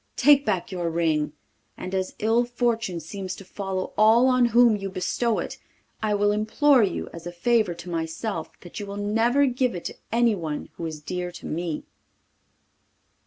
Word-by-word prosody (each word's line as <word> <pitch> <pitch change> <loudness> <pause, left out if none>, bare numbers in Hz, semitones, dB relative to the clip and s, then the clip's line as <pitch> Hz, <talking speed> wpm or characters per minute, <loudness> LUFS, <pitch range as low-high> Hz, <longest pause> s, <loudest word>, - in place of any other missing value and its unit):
Take 280 0 +5
back 190 -3 -1
your 175 -2 -2
ring, 160 -3 0 0.4
and 185 - -6
as 190 -1 -2
ill 225 +3 +2
fortune 235 -6 -1
seems 185 +3 -6
to 195 - -12
follow 190 -1 -4
all 220 +3 +6
on 255 -1 +4
whom 235 -1 +5
you 195 -1 -4
bestow 210 +5 0
it, - - -4 0.4
I 215 -1 +1
will 205 0 +3
implore 235 +6 +3
you, 195 -5 -1
as 170 0 -8
a - - -4
favour 210 +1 +1
to 170 +1 -11
myself, 165 +2 -3
that 175 - -9
you 205 - -6
will 200 0 -6
never 225 +7 +2
give 250 -4 0
it 175 - -7
to - - -4 0.2
anyone 210 -10 0
who 165 - -5
is 155 -2 -7
dear 180 +2 -4
to - - -10
me. 165 -1 -3
200 Hz, 175 wpm, -25 LUFS, 175-235 Hz, 0.4 s, all